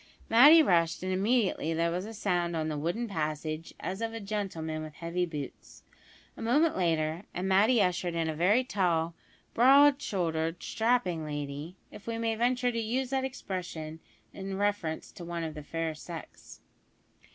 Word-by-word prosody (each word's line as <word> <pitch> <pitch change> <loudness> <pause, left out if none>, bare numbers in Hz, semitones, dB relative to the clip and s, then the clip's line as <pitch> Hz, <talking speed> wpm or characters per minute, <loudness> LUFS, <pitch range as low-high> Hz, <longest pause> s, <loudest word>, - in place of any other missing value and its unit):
Matty 290 +8 +9
rushed, 170 - +2
and 185 0 -1
immediately 195 -5 +1
there 170 +1 +1
was 180 +4 -3
a 225 - -8
sound 175 -5 0
on 160 -1 -1
the 150 - -3
wooden 175 +10 -2
passage 155 -3 -3
as 190 +4 -4
of 225 0 -2
a - - -4
gentleman 190 -7 -3
with 155 -1 -8
heavy 175 +2 -2
boots. 150 -4 -8 0.5
A - - -10
moment 295 +8 +3
later, 165 -1 0
and 180 +2 -2
Matty 210 +6 +4
ushered 175 -1 -1
in 165 -1 0
a 160 - -1
very 190 +11 +3
tall, 170 -8 0 0.4
broad 275 +3 +6
shouldered, 165 - -2
strapping 220 -8 0
lady; 145 +2 -5 0.2
if 210 - -12
we 230 -1 -2
may 230 0 0
venture 245 +2 +1
to 230 - -2
use 245 +4 -1
that 265 -1 0
expression 170 -10 -5 0.3
in 195 0 -5
reference 205 -6 -1
to 175 - -10
one 170 0 -4
of 160 -1 -4
the 150 - -7
fair 165 +2 -3
sex. 165 +2 -10
180 Hz, 170 wpm, -29 LUFS, 160-225 Hz, 0.5 s, Matty